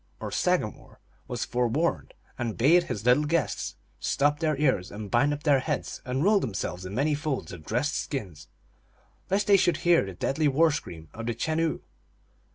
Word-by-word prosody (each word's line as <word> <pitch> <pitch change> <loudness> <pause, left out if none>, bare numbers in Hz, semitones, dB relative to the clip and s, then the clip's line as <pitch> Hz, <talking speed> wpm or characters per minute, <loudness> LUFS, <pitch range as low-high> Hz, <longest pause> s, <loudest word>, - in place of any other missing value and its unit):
or - - -5
sagamore, - - -1 0.3
was 120 -2 -3
forewarned, 125 +7 -1 0.2
and 120 -3 -3
bade 170 +8 +5
his 110 -7 -5
little 125 +5 +4
guests 150 -7 -1 0.2
stop 145 +1 +1
their 155 -3 0
ears 130 -11 +1
and 105 -1 -8
bind 145 0 +3
up 145 0 -4
their 145 -3 +4
heads, 150 +1 -3
and 130 +3 -1
roll 205 +2 +5
themselves 95 - -4
in 100 - -7
many 145 +5 +1
folds 145 - -3
of 85 -3 -9
dressed 125 - -1
skins, 100 - -5 0.8
lest 200 +2 +1
they 200 -1 +6
should 175 -4 +2
hear 175 -1 +5
the 95 -1 -6
deadly 145 - 0
war 155 +4 +4
scream 85 - -6
of 115 0 -6
the 120 - -1
Chenoo. 160 +6 -1
140 Hz, 175 wpm, -27 LUFS, 115-155 Hz, 0.8 s, they